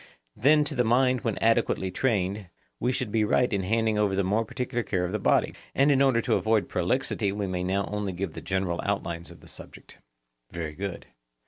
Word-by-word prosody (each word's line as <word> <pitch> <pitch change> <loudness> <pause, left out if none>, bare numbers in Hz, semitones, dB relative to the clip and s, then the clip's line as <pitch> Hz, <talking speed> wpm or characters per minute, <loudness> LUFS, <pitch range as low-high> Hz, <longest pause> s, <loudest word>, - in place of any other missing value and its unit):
Then, 150 +6 +4
to 145 - -3
the 125 - +2
mind 125 +2 +3
when 110 -3 -2
adequately 115 -4 +1
trained, 100 -3 -1 0.3
we 125 - +1
shall 130 -1 -1
be 110 0 +1
right 120 +3 +2
in 100 - +1
handing 110 +2 +1
over 100 -2 +2
the 100 - +1
more 105 +5 +1
particular 125 +2 -3
care 95 -5 -1
of 90 - -4
the 105 - -1
body; - - +2 0.2
and 140 +2 +4
in 135 -1 +3
order 130 -4 +4
to - - 0
avoid 110 -1 +2
prolixity 100 +2 0
we 100 0 -2
will 90 -1 -2
now 95 +2 0
only 105 -1 -3
give 90 -2 -4
the - - -7
general 95 -2 -1
outlines 85 0 -3
of - - -14
the - - -15
subject. - - -11 0.5
Very 80 -3 -5
good. 95 +3 -5
105 Hz, 210 wpm, -27 LUFS, 95-120 Hz, 0.5 s, Then